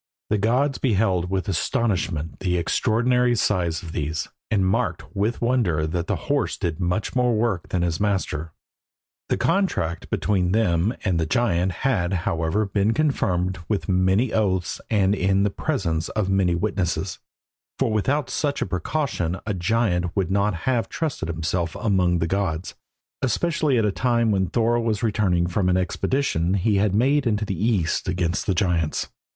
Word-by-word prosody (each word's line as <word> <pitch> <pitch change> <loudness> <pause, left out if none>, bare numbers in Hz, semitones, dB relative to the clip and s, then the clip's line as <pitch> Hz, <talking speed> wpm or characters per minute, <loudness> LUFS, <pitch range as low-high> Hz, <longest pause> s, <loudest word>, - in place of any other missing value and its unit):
The 105 - +2
gods 130 +7 +1
beheld 95 -7 +1
with 95 -1 -1
astonishment 90 -4 -1
the 90 -2 0
extraordinary 120 +7 +2
size 90 -7 0
of 80 - -7
these, 75 -1 -3 0.2
and 100 -4 +2
marked 95 - -1
with 110 +5 -1
wonder 110 -11 +1
that 85 +2 -2
the - - 0
horse 140 -4 0
did 85 -3 -3
much 90 +7 -1
more 125 -2 +2
work 105 -6 -1
than 90 -2 0
his 85 -2 -1
master. 95 -6 -1 0.8
The - - +1
contract 85 - 0
between 95 -3 +1
them 100 -3 +2
and 90 -5 +1
the 80 - 0
giant 95 -3 +1
had, 100 -9 +1
however, 85 +6 0
been 100 +2 +1
confirmed 95 - 0
with 105 -3 -1
many 95 +5 +2
oaths 95 -5 0
and 100 -3 +3
in 95 -1 +2
the 105 - +1
presence 90 - -2
of 105 -3 -1
many 95 -3 +2
witnesses, 95 -1 -2 0.6
for - - +1
without 130 +7 0
such 145 -1 -1
a - - -3
precaution 90 - -2
a 105 - -1
giant 90 -2 0
would 95 -3 0
not 100 0 +1
have 120 -4 +1
trusted 150 - -3
himself 85 +2 -2
among 95 -4 +2
the 85 - 0
gods, 90 -2 -2 0.5
especially 155 +1 +1
at 110 - +2
a 105 - +2
time 115 0 +1
when 95 -2 +1
Thor 120 +2 +1
was 115 -1 -1
returning 95 -6 +1
from 90 +1 0
an 90 - +3
expedition 95 - 0
he 100 +2 +2
had 100 -1 +2
made 135 +4 +3
into 105 -1 0
the 100 - -2
east 100 -8 +1
against 90 0 -1
the 95 - +1
giants. 85 -4 0
100 Hz, 165 wpm, -23 LUFS, 90-115 Hz, 0.8 s, and